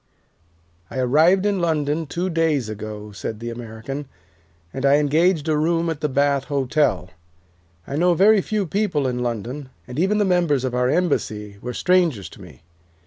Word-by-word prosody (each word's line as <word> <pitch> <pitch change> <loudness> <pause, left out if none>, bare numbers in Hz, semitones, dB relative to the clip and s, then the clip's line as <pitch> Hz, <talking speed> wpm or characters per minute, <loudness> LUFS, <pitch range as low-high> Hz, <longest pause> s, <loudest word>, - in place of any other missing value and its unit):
'" 85 - -38 0.3
"I - - -7
arrived 160 +10 +3
in 205 -2 +1
London 155 -1 0
two 175 +5 -2
days 160 -8 +1
ago," 105 0 -7
said 105 +2 -6
the 120 0 -5
American, 120 +4 -7 0.7
"and 135 - -5
I 140 0 +5
engaged 155 +3 +2
a 155 - +2
room 165 +2 +1
at 155 -2 -6
the 150 - 0
Bath 140 0 +1
Hotel. 140 - 0 0.7
I 140 - -4
know 175 +1 +3
very 205 +4 +5
few 210 +1 -1
people 180 -5 0
in 125 -1 -1
London, 125 +4 -4 0.2
and 125 +3 -5
even 195 +4 +2
the 210 - +2
members 175 -8 +2
of 130 -2 -2
our 125 0 +1
embassy 105 - -1
were 125 0 -5
strangers 170 - +1
to 100 - -14
me. 80 -7 -14
145 Hz, 175 wpm, -22 LUFS, 120-170 Hz, 0.7 s, I